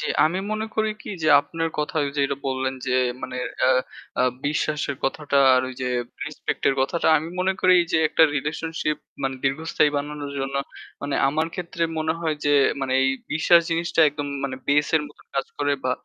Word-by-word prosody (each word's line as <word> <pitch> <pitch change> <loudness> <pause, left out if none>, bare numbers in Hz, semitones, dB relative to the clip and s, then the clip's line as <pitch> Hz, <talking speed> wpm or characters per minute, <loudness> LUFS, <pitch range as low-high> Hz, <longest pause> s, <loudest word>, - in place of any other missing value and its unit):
জি। - - -2 0.2
আমি 170 +4 +1
মনে 215 +1 -2
করি 220 0 +1
কি - - -10
যে 155 - +2
আপনার 165 +3 -3
কথা 150 +3 -2
ওই 140 - -2
যে - - +2
ওটা 140 - -3
বললেন 130 0 -1
যে 125 - 0 0.3
মানে 125 - -5 0.3
আ - - +5 0.5
আ - - +5 0.2
বিশ্বাসের 150 -1 -1
কথাটা 140 +1 -1 0.2
আর 130 - +4
ওই 130 - -8
যে - - -1 0.4
রেসপেক্ট - - -4
এর 135 - +2
কথাটা 140 +6 0
আমি 155 +2 -6
মনে 190 +1 +2
করি 185 0 +5 0.2
যে 160 - +4
একটা 160 - +3
রিলেশনশিপ 155 +1 -2 0.3
মানে 135 0 -1
দীর্ঘস্থায়ী 150 +2 +1
বানানোর 145 0 -4
জন্য 135 +1 -3 0.5
মানে 145 -1 -2
আমার 155 +3 0
ক্ষেত্রে 170 -1 -4 0.2
মনে 160 0 0
হয় 160 -2 -1
যে 145 - +3 0.5
এই 135 - +3 0.2
বিশ্বাস 170 +2 +5
জিনিসটা 165 0 0
একদম 145 0 -5 0.2
মানে 130 -1 -3
base 145 +1 +3
এর 155 - 0
মত 145 - -20 0.2
কাজ 135 -1 0
করে 145 0 +1
বা 130 - +1
150 Hz, 190 wpm, -24 LUFS, 140-160 Hz, 0.5 s, আ